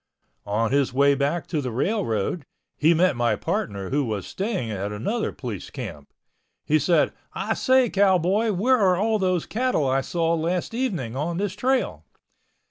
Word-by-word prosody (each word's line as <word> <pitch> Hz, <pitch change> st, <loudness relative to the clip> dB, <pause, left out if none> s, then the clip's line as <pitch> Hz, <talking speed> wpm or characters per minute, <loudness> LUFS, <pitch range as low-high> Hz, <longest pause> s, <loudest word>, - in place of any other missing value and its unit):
On 110 Hz, +3 st, 0 dB
his 140 Hz, -1 st, +2 dB
way 140 Hz, +2 st, +4 dB
back 140 Hz, +3 st, -1 dB
to 155 Hz, -4 st, -2 dB
the 130 Hz, -, -3 dB
railroad, 135 Hz, -, -1 dB, 0.3 s
he 155 Hz, +3 st, +3 dB
met 180 Hz, -1 st, +3 dB
my 120 Hz, -2 st, +1 dB
partner 100 Hz, -1 st, -3 dB
who 145 Hz, +1 st, +2 dB
was 105 Hz, -6 st, -3 dB
staying 190 Hz, -, -3 dB
at 100 Hz, 0 st, -3 dB
another 205 Hz, -, -2 dB
police 115 Hz, -8 st, -6 dB
camp. 70 Hz, -1 st, -8 dB, 0.5 s
He 155 Hz, +1 st, +3 dB
said, 170 Hz, 0 st, +2 dB, 0.2 s
"I 205 Hz, +3 st, -1 dB
say, 260 Hz, +1 st, +3 dB
Cowboy, 195 Hz, +2 st, +2 dB
where 240 Hz, +7 st, +2 dB
are 185 Hz, -3 st, +3 dB
all 215 Hz, +2 st, +1 dB
those 185 Hz, -3 st, 0 dB
cattle 245 Hz, -, 0 dB
I 135 Hz, +1 st, +2 dB
saw 165 Hz, +3 st, 0 dB
last 170 Hz, +5 st, -1 dB
evening 190 Hz, -, -2 dB
on 165 Hz, +5 st, -2 dB
this 200 Hz, -1 st, -1 dB
trail?" 255 Hz, +5 st, 0 dB
165 Hz, 165 wpm, -24 LUFS, 130-205 Hz, 0.5 s, way